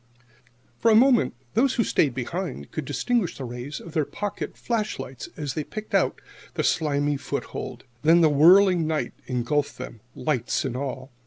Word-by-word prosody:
For 230 Hz, -, +4 dB
a 220 Hz, -, +6 dB
moment 245 Hz, 0 st, +5 dB, 0.2 s
those 255 Hz, +4 st, +3 dB
who 230 Hz, -, +3 dB
stayed 140 Hz, -, +2 dB
behind 130 Hz, -, -4 dB
could 155 Hz, -, -4 dB
distinguish 185 Hz, -, 0 dB
the 135 Hz, -, -5 dB
rays 125 Hz, +4 st, -6 dB
of 165 Hz, -, -11 dB
their 155 Hz, -, +2 dB
pocket 205 Hz, +7 st, -5 dB
flash 220 Hz, -3 st, -1 dB
lights 125 Hz, -2 st, -7 dB
as 145 Hz, -4 st, -3 dB
they 155 Hz, -, -2 dB
picked 215 Hz, +7 st, -8 dB
out -, -, +2 dB, 0.4 s
their -, -, 0 dB
slimy 145 Hz, -2 st, +1 dB
foothold. 140 Hz, -, -5 dB, 0.2 s
Then 165 Hz, +3 st, +5 dB
the 160 Hz, -, +6 dB
whirling 170 Hz, +3 st, +6 dB
night 155 Hz, -1 st, -1 dB
engulfed 135 Hz, +4 st, -1 dB
them, 115 Hz, -, -8 dB
lights 130 Hz, -6 st, -1 dB
and 130 Hz, -2 st, -3 dB
all. 130 Hz, 0 st, -4 dB
150 Hz, 170 wpm, -25 LUFS, 135-195 Hz, 0.4 s, a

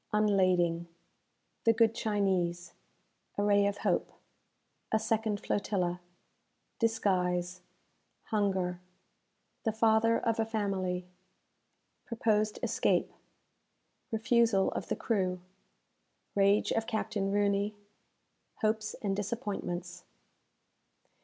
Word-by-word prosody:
Unlading 185 Hz, -5 st, +2 dB, 0.8 s
The 230 Hz, -, +5 dB
Good 225 Hz, 0 st, +4 dB
Chinese 190 Hz, -6 st, 0 dB, 0.6 s
A 205 Hz, -, +1 dB
Ray 205 Hz, 0 st, +4 dB
of 200 Hz, 0 st, -2 dB
Hope -, -, +1 dB, 0.8 s
A 220 Hz, -, +4 dB
Second 220 Hz, -1 st, 0 dB
Flotilla 180 Hz, -4 st, -1 dB, 0.8 s
Disguise 180 Hz, -5 st, 0 dB, 0.7 s
Hunger 190 Hz, -4 st, 0 dB, 0.8 s
The 225 Hz, -, +1 dB
Father 220 Hz, +1 st, +3 dB
of 230 Hz, -1 st, -1 dB
a -, -, +4 dB
Family 190 Hz, -5 st, -1 dB, 1.0 s
Proposed 215 Hz, -2 st, +1 dB
Escape -, -, +1 dB, 1.0 s
Refusal 225 Hz, -2 st, +3 dB
of -, -, -4 dB
the -, -, -1 dB
Crew 185 Hz, -5 st, -1 dB, 0.9 s
Rage 200 Hz, +1 st, +3 dB
of 225 Hz, 0 st, 0 dB
Captain 205 Hz, -3 st, -1 dB
Rooney 205 Hz, 0 st, +1 dB, 0.9 s
Hopes 215 Hz, 0 st, 0 dB
and 195 Hz, -2 st, 0 dB
Disappointments. 195 Hz, -5 st, -4 dB
205 Hz, 90 wpm, -31 LUFS, 185-220 Hz, 1.0 s, The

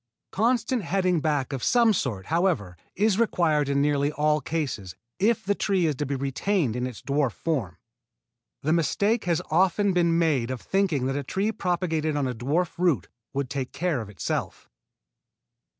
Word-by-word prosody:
Constant 235 Hz, +2 st, +1 dB
heading 180 Hz, -1 st, +1 dB
back 145 Hz, -3 st, 0 dB
of 135 Hz, -, -3 dB
some 235 Hz, -3 st, +4 dB
sort, 110 Hz, -, -2 dB
however, 165 Hz, -, 0 dB, 0.2 s
is 210 Hz, +1 st, +2 dB
required 160 Hz, -10 st, +2 dB
in 140 Hz, 0 st, +2 dB
nearly 145 Hz, 0 st, +1 dB
all 150 Hz, +1 st, +2 dB
cases, 135 Hz, -, -3 dB, 0.2 s
if 220 Hz, +3 st, +2 dB
the 205 Hz, -, +2 dB
tree 195 Hz, -3 st, +1 dB
is 155 Hz, -, +2 dB
to 145 Hz, +1 st, -3 dB
be 140 Hz, -, -1 dB
retained 140 Hz, -, 0 dB
in 125 Hz, +1 st, -1 dB
its 125 Hz, -4 st, -9 dB
dwarf 140 Hz, -3 st, 0 dB
form. 120 Hz, -, -2 dB, 0.9 s
The 155 Hz, +3 st, +2 dB
mistake 200 Hz, +7 st, +1 dB
has 170 Hz, -3 st, +1 dB
often 190 Hz, +4 st, +3 dB
been 170 Hz, -2 st, +3 dB
made 145 Hz, -8 st, +1 dB
of 130 Hz, -1 st, -3 dB
thinking 185 Hz, -8 st, 0 dB
that 135 Hz, +1 st, -1 dB
a 145 Hz, -, -1 dB
tree 195 Hz, +10 st, -1 dB
propagated 165 Hz, -6 st, -1 dB
on 140 Hz, -2 st, 0 dB
a 125 Hz, -, -2 dB
dwarf 150 Hz, +10 st, -1 dB
root 165 Hz, -, +1 dB, 0.2 s
would 140 Hz, -1 st, -2 dB
take 130 Hz, 0 st, -4 dB
care 170 Hz, -7 st, -1 dB
of 110 Hz, -, -8 dB
itself. 100 Hz, -5 st, -4 dB
155 Hz, 170 wpm, -26 LUFS, 135-185 Hz, 0.9 s, some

